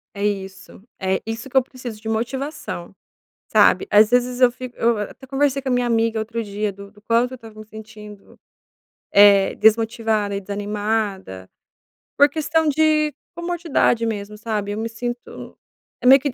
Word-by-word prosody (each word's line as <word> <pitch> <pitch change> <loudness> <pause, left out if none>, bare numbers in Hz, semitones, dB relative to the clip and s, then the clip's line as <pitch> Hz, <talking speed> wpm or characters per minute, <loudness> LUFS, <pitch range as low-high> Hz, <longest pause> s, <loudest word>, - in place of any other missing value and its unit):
É 200 0 -2
isso, 195 -2 -5 0.2
é, 190 0 -1
isso 225 +4 -6
que 265 - 0
eu - - +7
preciso 245 -4 -9
de 220 - -5
motivação, 245 - -4 0.6
sabe. - - +4
Às 210 +1 +6
vezes 245 +1 +1
eu 250 -1 +6
fico 250 0 -9
eu, 230 -1 +2
eh, - - 0
até 265 - -15
conversei 275 0 0
com 265 - -4
a - - 0
minha 245 0 +1
amiga 225 -1 +1
outro 230 +1 -4
dia 205 0 -3
do 200 +1 -12
do 210 - -21
quanto 235 +3 +1
eu - - -6
estava 225 -3 -13
me 215 - -10
sentindo, 215 -2 -13 0.7
eh, 200 -1 +6
desmotivada 220 -2 +2
e - - -3
desanimada, 205 - -3 0.7
por 285 +1 +6
questão 315 +2 0
de 305 0 +2 0.2
comodidade 340 -9 0
mesmo, 210 -1 -4
sabe. 210 -2 -3
Eu 205 - -4
me 225 +1 -3
sinto 240 +2 -7 0.5
é - - +2
meio 270 +2 +9
que 285 -2 -2
225 Hz, 175 wpm, -21 LUFS, 210-255 Hz, 0.7 s, meio